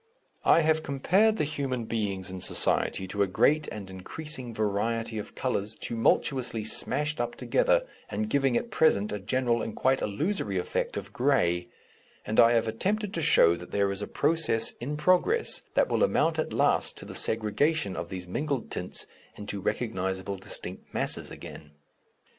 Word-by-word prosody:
I -, -, +5 dB
have 160 Hz, 0 st, +2 dB
compared 190 Hz, +11 st, +2 dB
the -, -, +1 dB
human 140 Hz, -5 st, -2 dB
beings 100 Hz, -5 st, -3 dB
in 95 Hz, -1 st, -7 dB
society 95 Hz, -, +1 dB
to 100 Hz, +2 st, -2 dB
a 100 Hz, -, +3 dB
great 150 Hz, +11 st, +2 dB
and 105 Hz, -3 st, -7 dB
increasing 125 Hz, -, -5 dB
variety 110 Hz, +1 st, -1 dB
of 105 Hz, -, -8 dB
colours 110 Hz, -4 st, -2 dB
tumultuously 120 Hz, 0 st, 0 dB
smashed 150 Hz, +6 st, 0 dB
up 120 Hz, 0 st, -3 dB
together, -, -, +2 dB, 0.3 s
and 220 Hz, -, -2 dB
giving 135 Hz, -, +2 dB
at 235 Hz, -, -4 dB
present 105 Hz, -10 st, +3 dB
a 105 Hz, -, -3 dB
general 120 Hz, +3 st, 0 dB
and 110 Hz, -, -5 dB
quite 130 Hz, 0 st, +2 dB
illusory 105 Hz, -, -1 dB
effect 90 Hz, -, -2 dB
of 100 Hz, 0 st, -7 dB
grey, 90 Hz, -10 st, +1 dB, 0.6 s
and 110 Hz, -, 0 dB
I 115 Hz, +1 st, +7 dB
have 115 Hz, -1 st, +2 dB
attempted 200 Hz, -, -1 dB
to 165 Hz, -, -2 dB
show 85 Hz, -, +5 dB
that 90 Hz, +1 st, -10 dB
there 100 Hz, -1 st, +1 dB
is 100 Hz, +1 st, 0 dB
a 105 Hz, -, -3 dB
process 145 Hz, -7 st, +2 dB
in 145 Hz, +5 st, -3 dB
progress 185 Hz, -, +2 dB
that -, -, +4 dB
will -, -, 0 dB
amount 165 Hz, -, +2 dB
at -, -, -1 dB
last -, -, +2 dB
to -, -, -7 dB
the -, -, -8 dB
segregation 110 Hz, -, +1 dB
of -, -, -5 dB
these 90 Hz, -2 st, -6 dB
mingled 140 Hz, +6 st, -3 dB
tints 90 Hz, -, -3 dB, 0.3 s
into 100 Hz, -1 st, -5 dB
recognizable 95 Hz, -3 st, -2 dB
distinct 90 Hz, -1 st, -5 dB
masses -, -, +1 dB
again. 75 Hz, -1 st, -10 dB
115 Hz, 165 wpm, -28 LUFS, 100-150 Hz, 0.6 s, I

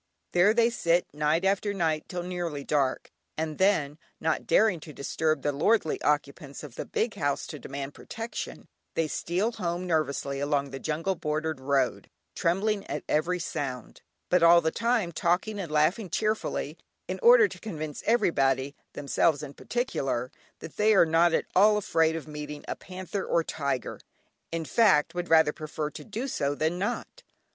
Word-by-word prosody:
There 180 Hz, +4 st, +5 dB
they 235 Hz, 0 st, +4 dB
sit 175 Hz, -6 st, +2 dB
night 150 Hz, +4 st, +1 dB
after 200 Hz, +1 st, +1 dB
night 160 Hz, -4 st, 0 dB
till 175 Hz, -1 st, -4 dB
nearly 175 Hz, -5 st, -4 dB
dark, 140 Hz, -3 st, 0 dB, 0.3 s
and 155 Hz, -1 st, -3 dB
then, 160 Hz, -7 st, +2 dB, 0.2 s
not 160 Hz, 0 st, -1 dB
daring 210 Hz, -6 st, +4 dB
to 155 Hz, 0 st, -11 dB
disturb 155 Hz, +1 st, -1 dB
the 145 Hz, -, +1 dB
lordly 160 Hz, +5 st, +1 dB
occupants 145 Hz, 0 st, -1 dB
of 145 Hz, -5 st, -9 dB
the -, -, -6 dB
big 225 Hz, -1 st, -1 dB
house, 145 Hz, -1 st, -1 dB
to 150 Hz, -, -8 dB
demand 135 Hz, +2 st, -6 dB
protection, 225 Hz, +1 st, -7 dB, 0.3 s
they 165 Hz, -, +1 dB
steal 180 Hz, +8 st, -1 dB
home 175 Hz, -4 st, -3 dB
nervously 140 Hz, -4 st, -1 dB
along 140 Hz, -1 st, 0 dB
the 135 Hz, -, -6 dB
jungle 160 Hz, +7 st, -1 dB
bordered 155 Hz, -2 st, -2 dB
road, 135 Hz, -1 st, 0 dB, 0.2 s
trembling 195 Hz, +4 st, 0 dB
at -, -, -4 dB
every 175 Hz, +4 st, +1 dB
sound, 140 Hz, -7 st, -5 dB, 0.3 s
but 180 Hz, -, +4 dB
all 170 Hz, +1 st, +8 dB
the 160 Hz, -1 st, 0 dB
time 230 Hz, -5 st, 0 dB
talking 180 Hz, +6 st, 0 dB
and 175 Hz, -5 st, -5 dB
laughing 160 Hz, +7 st, +2 dB
cheerfully, 215 Hz, +4 st, -2 dB, 0.3 s
in -, -, -4 dB
order 475 Hz, -1 st, +7 dB
to -, -, -11 dB
convince 155 Hz, -8 st, -6 dB
everybody 140 Hz, -, +2 dB, 0.2 s
(themselves 145 Hz, +1 st, +1 dB
in 145 Hz, -1 st, -7 dB
particular) 135 Hz, -, -2 dB, 0.3 s
that 160 Hz, -, -10 dB
they 215 Hz, +1 st, +4 dB
are 180 Hz, -, +7 dB
not 165 Hz, +2 st, +4 dB
at -, -, +1 dB
all 210 Hz, +3 st, +6 dB
afraid 165 Hz, -5 st, +2 dB
of 160 Hz, -1 st, -6 dB
meeting 150 Hz, -1 st, -7 dB
a -, -, -3 dB
panther 185 Hz, +1 st, -6 dB
or 165 Hz, -, +1 dB
tiger, 140 Hz, -6 st, -3 dB, 0.5 s
in 165 Hz, -1 st, -3 dB
fact 190 Hz, -7 st, +3 dB
would 175 Hz, 0 st, -4 dB
rather 160 Hz, -2 st, +5 dB
prefer 155 Hz, 0 st, -4 dB
to -, -, -9 dB
do 230 Hz, +5 st, -4 dB
so 145 Hz, -, -1 dB
than 160 Hz, +4 st, -1 dB
not. 240 Hz, -, -3 dB
160 Hz, 170 wpm, -28 LUFS, 150-190 Hz, 0.5 s, all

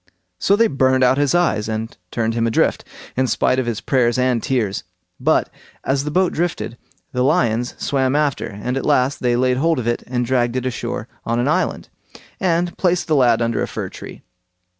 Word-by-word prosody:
So 200 Hz, -, +3 dB
they 230 Hz, +2 st, +4 dB
burned 130 Hz, -7 st, +2 dB
out 130 Hz, +2 st, +4 dB
his 145 Hz, +3 st, +2 dB
eyes 165 Hz, -12 st, +1 dB
and 110 Hz, +1 st, -4 dB
turned 115 Hz, +1 st, -1 dB
him 115 Hz, 0 st, +1 dB
adrift, 115 Hz, -, +1 dB, 0.3 s
in 130 Hz, 0 st, +1 dB
spite 130 Hz, +2 st, +1 dB
of 130 Hz, -, -2 dB
his 115 Hz, -3 st, -2 dB
prayers 125 Hz, -2 st, +2 dB
and 125 Hz, -2 st, +1 dB
tears; 110 Hz, -7 st, -1 dB, 0.4 s
but, -, -, +2 dB, 0.4 s
as 135 Hz, +1 st, 0 dB
the -, -, -1 dB
boat 185 Hz, +3 st, +1 dB
drifted, 165 Hz, -7 st, -2 dB, 0.4 s
the 125 Hz, -, -1 dB
lions 120 Hz, -2 st, +1 dB
swam 135 Hz, -1 st, 0 dB
after, 150 Hz, -3 st, 0 dB
and 115 Hz, +6 st, -4 dB
at 135 Hz, -, -2 dB
last 130 Hz, +3 st, +2 dB
they 120 Hz, -1 st, +1 dB
laid 125 Hz, +1 st, +2 dB
hold 165 Hz, +3 st, +2 dB
of 125 Hz, -, -3 dB
it 120 Hz, 0 st, 0 dB
and 125 Hz, -1 st, -1 dB
dragged 120 Hz, -1 st, +1 dB
it 130 Hz, 0 st, -2 dB
ashore 120 Hz, -2 st, -3 dB, 0.2 s
on 115 Hz, +1 st, -1 dB
an 120 Hz, -, +1 dB
island, -, -, 0 dB, 0.5 s
and 175 Hz, -1 st, 0 dB
placed 180 Hz, -1 st, +1 dB
the 155 Hz, -, +1 dB
lad 120 Hz, -4 st, +4 dB
under 115 Hz, -1 st, 0 dB
a -, -, -1 dB
fir -, -, -5 dB
tree. -, -, -11 dB
130 Hz, 200 wpm, -20 LUFS, 120-140 Hz, 0.5 s, they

